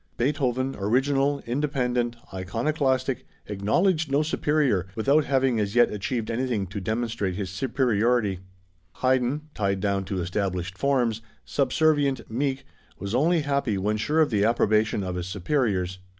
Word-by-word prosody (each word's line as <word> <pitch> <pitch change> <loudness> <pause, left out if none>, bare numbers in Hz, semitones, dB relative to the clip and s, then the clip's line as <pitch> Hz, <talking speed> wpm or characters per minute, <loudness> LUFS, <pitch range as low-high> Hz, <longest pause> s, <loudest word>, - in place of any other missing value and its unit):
Beethoven, 130 0 0
original, 135 +7 +1
independent, 125 -2 -1 0.2
iconoclastic, 130 - -1 0.2
acknowledged 155 - +1
no 145 +2 +3
superior, 145 - +1
without 140 +7 +3
having 135 -4 +2
as 100 0 -2
yet 120 -1 +5
achieved 110 +3 -3
anything 115 -4 -1
to 100 +2 -6
demonstrate 110 -2 -2
his 95 -1 -4
superiority; 115 -3 +1 0.6
Haydn, 130 +2 +2
tied 100 -2 0
down 100 0 0
to 95 -1 -3
established 90 0 -2
forms, 120 -1 +1 0.2
subservient, 140 -2 +1
meek, 135 +3 -1 0.3
was 100 +2 -5
only 160 +6 +3
happy 140 -7 0
when 105 +3 0
sure 150 +9 +1
of 150 - +2
the 105 -2 +2
approbation 110 -2 +2
of 90 -1 -3
his 90 0 -4
superiors. 95 -3 -1
120 Hz, 135 wpm, -25 LUFS, 100-135 Hz, 0.6 s, yet